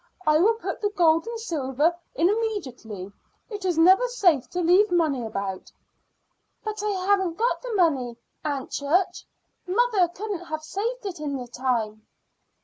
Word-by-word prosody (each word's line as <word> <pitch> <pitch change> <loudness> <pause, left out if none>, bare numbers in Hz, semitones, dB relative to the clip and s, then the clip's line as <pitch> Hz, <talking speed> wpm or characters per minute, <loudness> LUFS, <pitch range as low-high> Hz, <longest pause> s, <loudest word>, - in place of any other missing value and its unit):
I 305 0 +4
will 440 +6 +4
put 450 - -5
the 415 - +1
gold 335 -2 +3
and 465 -1 -4
silver 310 - 0 0.2
in 335 - +3
immediately. 265 - -3 0.4
It 410 -2 -5
is 355 -3 +1
never 375 +9 +6
safe 355 - +2
to 360 - -3
leave 360 +5 +4
money 315 -8 +1
about." 195 -4 -4 0.9
"But 430 -1 -4
I 425 - 0 0.2
haven't 380 -4 +2
got 470 +2 +1
the - - -4
money, 270 - +1 0.3
Aunt 285 -3 -3
Church. 330 +7 0 0.4
Mother 410 -1 +3
couldn't 365 0 -5
have 310 -1 -5
saved 445 +8 -3
it 370 -5 -5
in 290 -2 -3
the 250 - -6
time." 230 -4 -2
345 Hz, 155 wpm, -25 LUFS, 275-415 Hz, 0.9 s, never